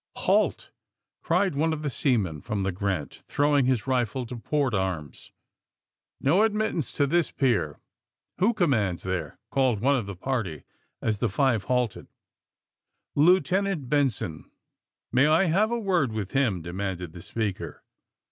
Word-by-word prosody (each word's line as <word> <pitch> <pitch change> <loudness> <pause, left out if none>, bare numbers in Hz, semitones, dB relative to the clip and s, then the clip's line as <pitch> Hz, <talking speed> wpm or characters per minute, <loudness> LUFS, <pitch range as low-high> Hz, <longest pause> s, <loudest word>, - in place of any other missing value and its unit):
*^Halt!" - - +1 0.5
cried 195 -4 +1
one 160 +3 +1
of 155 -1 -5
the 145 - 0
seamen 105 - 0
from 100 +3 -2
the 95 - 0
Grant, 90 -7 -3
' - - -47
' - - -48
throwing 145 -2 +2
his 130 -4 +1
rifle 130 -1 0
to 125 - -7
port 135 +2 -1
arms. 90 -8 -3 0.9
No 165 +9 +3
admittance 215 - 0
to 145 - +2
this 170 +3 +1
pier!" 105 - 0 0.6
^^"Who 215 +5 +3
commands 110 - +1
there!" 95 -1 -3
called 130 -6 +2
one 140 +6 +3
of 120 -7 -2
the 100 - -6
party, 95 - -3 0.4
as 110 -2 0
the 120 - +1
five 115 -2 +1
halted. 125 -4 -1 0.6
'* - - -57
Lieutenant 180 -1 +3
Benson." 130 - 0 0.6
*^May 135 +4 +5
I 160 +4 +5
have 195 +6 +2
a 235 - 0
word 185 - +1
with 105 -3 -4
him!" 120 -11 +1
demanded 90 -1 -4
the 90 - -9
speaker. 105 0 -4
125 Hz, 155 wpm, -26 LUFS, 100-150 Hz, 0.9 s, ^May